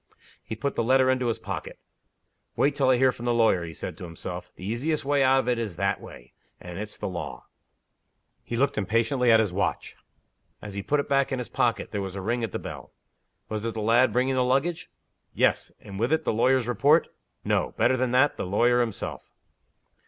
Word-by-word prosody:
He 110 - -6
put 140 +6 -2
the - - 0
letter 130 +2 +4
into 130 -1 0
his 115 - 0
pocket. - - -6 0.8
"Wait 140 +1 +2
till 135 -2 +1
I 130 - +5
hear 130 +1 +4
from 120 - -9
the 120 - +2
lawyer," 110 -6 +3
he 80 -1 -7
said 85 - -6
to - - -8
himself. 85 -2 -7
"The 90 - -10
easiest 140 +8 -1
way 145 0 +2
out 135 0 +4
of - - -10
it 125 -2 +1
is 105 -7 -4
that 100 +3 -1
way. - - -13 0.3
And 90 0 -8
it's 105 0 -6
the - - -4
law." 75 -9 -6 1.0
He 120 - -4
looked 140 -2 +1
impatiently 115 +4 +2
at 110 - +7
his 105 -5 0
watch. 100 +2 -2 0.6
As 105 - -9
he 100 - -3
put 145 +9 0
it 140 - -2
back 140 -1 +2
again 135 - -2
in 125 - -3
his 120 - -8
pocket 115 -3 0
there 100 - -2
was 95 -1 -5
a 100 - -4
ring 120 +4 -1
at 115 - -2
the - - -2
bell. - - -8 0.6
Was 110 -1 -4
it 115 -1 -3
the 110 - -3
lad 120 +4 +4
bringing 130 +2 +1
the 130 -1 +2
luggage? 150 +7 0 0.5
Yes. - - +1
And, 100 -1 -9
with 120 +5 0
it, 160 - +1
the - - +1
lawyer's 125 +2 +2
report? 145 +6 +3 0.4
No. - - 0
Better 130 - +3
than 130 0 0
that 130 +4 +3
the - - -3
lawyer 120 +5 +3
himself. 115 -5 -4
120 Hz, 220 wpm, -26 LUFS, 105-130 Hz, 1.0 s, at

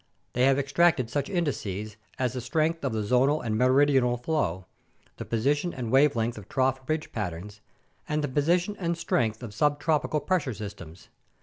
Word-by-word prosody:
They 125 +1 +3
have 135 0 +4
extracted 140 -2 +2
such 145 -1 -1
indices 110 - -2 0.2
as 125 -2 -1
the 125 - -4
strength 155 +5 0
of 135 - 0
the 110 -1 -2
zonal 130 +7 +3
and 110 -1 -1
meridional 130 0 +3
flow, 120 - -1 0.5
the - - -6
position 145 +9 0
and 120 -3 -4
wavelength 120 -5 +3
of 100 - -14
trough 130 0 +1
ridge 155 0 -2
patterns, 105 0 -5 0.5
and 150 0 0
the - - 0
position 170 +8 +1
and 170 -2 -1
strength 115 -8 -1
of 110 -4 -7
subtropical 150 +4 +1
pressure 155 - 0
systems. 90 -5 -9
130 Hz, 165 wpm, -27 LUFS, 115-150 Hz, 0.5 s, have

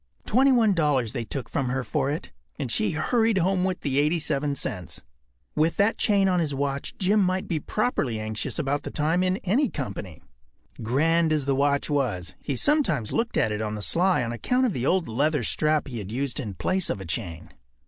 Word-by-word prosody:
Twenty 265 +5 +4
one 225 -5 +4
dollars 145 - +1
they 120 -4 -3
took 125 +1 -4
from 135 - -1
her 130 +1 -1
for 140 0 -1
it, 150 +3 -4 0.3
and 125 - -4
she 105 - +1
hurried 225 +6 +2
home 185 +1 +2
with 185 -1 -1
the 140 -1 0
87 150 -2 0
cents. 90 -9 -5 0.5
With 155 +2 +1
that 205 +3 +2
chain 200 -2 +3
on 180 -1 +2
his 150 -4 -1
watch 140 0 -2
Jim 205 +3 +3
might 185 0 0
be 165 -4 -1
properly 150 - -1
anxious 110 0 -3
about 145 +1 0
the - - -6
time 160 +4 +1
in 185 0 +1
any 240 +8 +2
company. 100 - -6 0.6
Grand 160 +8 +2
as 150 -3 +1
the 140 - +1
watch 140 +1 +1
was, 120 - -1
he 140 - -3
sometimes 170 - +1
looked 230 +1 0
at 110 - +2
it 105 0 -2
on 110 0 -2
the 105 - -5
sly 180 - +2
on 115 - -3
account 250 - +1
of 235 - 0
the 130 -1 -1
old 185 -2 +2
leather 145 +7 +1
strap 155 0 +2
that 140 - -10
he 115 -3 -4
used 125 +8 -3
in 105 -8 -5
place 185 - +1
of - - -2
a 95 - -7
chain. 85 -1 -4
145 Hz, 210 wpm, -25 LUFS, 120-185 Hz, 0.6 s, Twenty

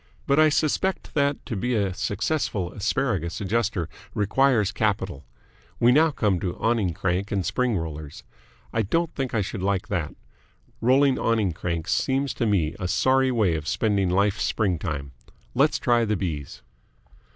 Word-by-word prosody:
But 140 +2 +3
I 155 0 +6
suspect 155 +6 0
that 140 -1 0
to 115 - -4
be 125 +5 -1
a 100 -3 0
successful 100 - -2
Asparagus 100 - -1
Adjuster 105 -4 -1 0.3
requires 110 0 +2
capital. 95 -8 -2 0.5
We 120 - +5
now 155 +5 +5
come 105 - 0
to 90 -2 -3
Awning 110 -7 0
Crank 95 +2 -1
and 95 -3 0
Spring 125 -5 0
Rollers. 75 -3 -6 0.5
I 115 - +2
don't 165 - 0
think 130 -3 -3
I 110 - +2
should 100 +1 -4
like 95 -1 -1
that. 85 -6 -2 0.7
Rolling 130 +3 +4
awning 110 -5 +1
cranks 85 0 -2
seems 135 -2 0
to 115 0 -1
me 90 -7 +1
a 90 - -2
sorry 130 +8 +3
way 105 -8 +2
of 80 -1 -4
spending 100 -4 +1
life's 100 +3 +1
springtime. 75 -8 -1 0.4
Let's - - +3
try 120 -1 +2
the 105 -1 0
B's." 75 -7 -5
105 Hz, 155 wpm, -25 LUFS, 90-125 Hz, 0.7 s, I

